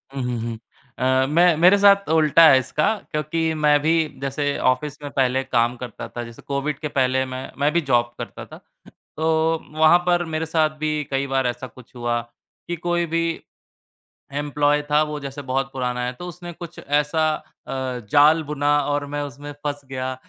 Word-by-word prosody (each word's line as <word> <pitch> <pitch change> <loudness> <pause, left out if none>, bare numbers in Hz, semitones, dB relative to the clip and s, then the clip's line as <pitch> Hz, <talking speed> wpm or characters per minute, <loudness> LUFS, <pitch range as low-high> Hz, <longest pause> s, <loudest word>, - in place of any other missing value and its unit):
हुँ, 135 - -2
हुँ, 125 -1 -2
हुँ। 115 -1 -4 0.4
अ, 130 +1 +2
मैं 170 +1 +4
मेरे 180 +4 +6
साथ 200 -2 +5
उल्टा 160 0 +6
है 130 - +6
इसका, 150 +10 0 0.2
क्योंकि 160 +1 -1
मैं 150 -1 +3
भी 160 +2 +2 0.3
जैसे 140 +1 -1
ऑफ़िस 145 +3 -4
में 145 - -5
पहले 130 0 +1
काम 120 -2 +1
करता 125 -3 -7
था, 120 - -6
जैसे 115 -1 -11
कोविड 140 +1 -3
के 150 - -3
पहले 130 -1 +1
मैं 130 0 -7
मैं 145 +1 +2
भी 170 - +2
जॉब 120 -1 +2
करता - - -7
था। - - -12 0.6
तो, 160 0 +1 0.2
वहाँ 160 +2 +7
पर 175 -1 +2
मेरे 160 +1 -1
साथ 160 -1 +2
भी 155 -1 -1
कई 135 +1 0
बार 135 -1 0
ऐसा 120 +1 -4
कुछ 125 +1 -17
हुआ, 120 -1 -1 0.5
कि 175 - -2
कोई 175 0 -1
भी 165 +1 0 1.1
एम्प्लॉयी 145 0 +1
था 150 +1 +4
वो 150 -1 -3
जैसे 140 +1 -7
बहुत 135 +1 -2
पुराना 125 -1 -2
है, 125 - -2
तो 175 +8 -9
उसने 175 0 -8
कुछ 170 0 -10
ऐसा 150 +2 0 0.4
अ, 130 -2 -3
जाल 150 +3 +5
बुना 145 0 +2
और 145 0 0
मैं 145 - -2
उसमें 145 +1 -7
फँस 145 -1 -2
गया। 130 0 -3
145 Hz, 185 wpm, -22 LUFS, 130-160 Hz, 1.1 s, वहाँ